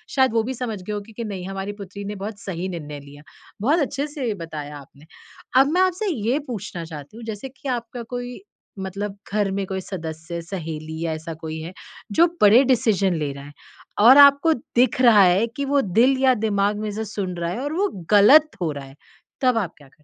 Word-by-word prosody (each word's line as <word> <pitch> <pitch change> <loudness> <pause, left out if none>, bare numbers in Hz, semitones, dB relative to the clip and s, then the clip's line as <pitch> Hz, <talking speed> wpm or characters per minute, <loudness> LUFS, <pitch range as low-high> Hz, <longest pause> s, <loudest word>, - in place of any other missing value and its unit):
शायद 260 -4 +3
वो 225 - +3
भी 260 - -2
समझ 225 -6 -4
गए 210 +3 -5
होंगे 205 +2 -6
कि 235 - -5
नहीं 195 -4 -5
हमारी 195 +1 -4
पुत्री 200 -1 -9
ने 205 +1 -5
बहुत 205 +1 -6
सही 185 -1 -4
निर्णय 150 -5 -6
लिया। 145 +1 -14 0.4
बहुत 295 +9 +3
अच्छे 280 +1 -1
से 275 -7 -3
बताया 150 -3 -7
आपने। 140 +2 -16 0.6
अब 275 - +3
मैं 365 - +3
आपसे 375 +3 +1
ये 240 +1 0
पूछना 205 -7 -5
चाहती 155 +4 -10
हूँ, 235 - -9
जैसे 220 +4 -6
कि 270 +1 -8
आपका 240 -1 -4
कोई 245 0 -5 0.4
मतलब 195 +1 -5 0.2
घर 205 -2 +1
में 195 0 -2
कोई 190 0 -3
सदस्य, 165 -2 -6
सहेली 160 -3 -6
या 160 - -1
ऐसा 160 +1 -6
कोई 160 0 -5
है 170 +3 -7 0.4
जो 335 +11 +5
बड़े 215 +5 +7
डिसीज़न 220 -7 +2
ले 150 -3 -2
रहा 140 0 -10
है 145 - -12 0.6
और 265 - +9
आपको 280 +4 +2
दिख 250 -2 0
रहा 225 -5 +7
है 185 +5 +4
कि 280 - -1
वो 280 - +4
दिल 235 +7 +3
या 260 -1 +6
दिमाग 205 0 +1
में 215 0 -3
जो 215 +2 -4
सुन 185 -3 -3
रहा 170 0 -2
है 225 - -4
और 290 +2 -3
वो 395 +5 +1 0.2
गलत 275 +10 +7
हो 160 -3 0
रहा 140 -1 -7
है, 135 0 -15 0.5
तब 255 -3 +3
आप 200 -6 0
करते 145 - -16
है? 135 - -20
205 Hz, 215 wpm, -22 LUFS, 170-245 Hz, 0.6 s, और